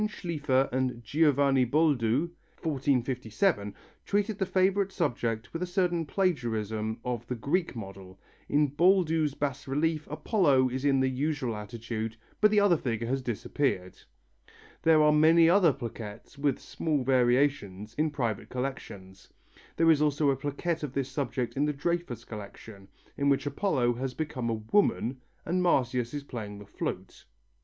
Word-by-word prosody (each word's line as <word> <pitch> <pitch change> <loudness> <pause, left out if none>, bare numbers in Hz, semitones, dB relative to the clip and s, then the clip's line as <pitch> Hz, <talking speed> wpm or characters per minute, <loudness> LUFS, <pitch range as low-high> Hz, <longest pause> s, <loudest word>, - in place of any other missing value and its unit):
Schlifer 150 -9 0
and 125 -2 -1
Giovanni 140 0 +3
Boldu 140 +1 +2 0.3
(1457) 130 - 0 0.3
treated 205 +1 -1
the 190 - 0
favourite 195 +1 +2
subject 120 - -2
with 165 - -4
a 180 - -1
certain 175 -3 0
plagiarism 110 - -1
of 120 -2 -3
the 125 - -2
Greek 145 +8 -1
model. 95 -3 -9 0.3
In 145 0 +3
Boldu's 160 -2 +3
bas 140 -1 -3
relief 155 +3 0
Apollo 145 - +2
is 130 +2 -4
in 135 -2 +3
the 130 - +2
usual 130 -2 -1
attitude, 110 +1 -5 0.2
but 210 - +7
the 210 0 +4
other 200 -4 +4
figure 115 -5 -2
has 135 +3 -1
disappeared. 120 -5 -2 0.9
There 160 -1 +5
are 150 0 +5
many 165 +2 +6
other 175 -2 +5
plaquettes, 115 -3 -8
with 140 -2 0
small 150 -5 -2
variations, 120 -5 +1
in 155 +5 0
private 120 -8 -3
collections. 105 -8 -6 0.5
There 165 0 +5
is 150 -2 +3
also 145 -1 +2
a - - 0
plaquette 145 +5 -3
of 145 -4 -5
this 135 -1 -2
subject 130 -3 -2
in 140 +2 +1
the 150 - 0
Dreyfus 145 -6 -3
collection, 100 -1 -10 0.3
in 140 0 +2
which 140 +1 +2
Apollo 140 -5 +1
has 130 0 -4
become 145 -6 -3
a 115 - 0 0.2
woman 135 - +2 0.2
and 180 +2 0
Marsyas 125 -8 +1
is 145 - -4
playing 110 -6 -7
the 105 - -11
flute. 100 - -6
135 Hz, 150 wpm, -29 LUFS, 120-160 Hz, 0.9 s, but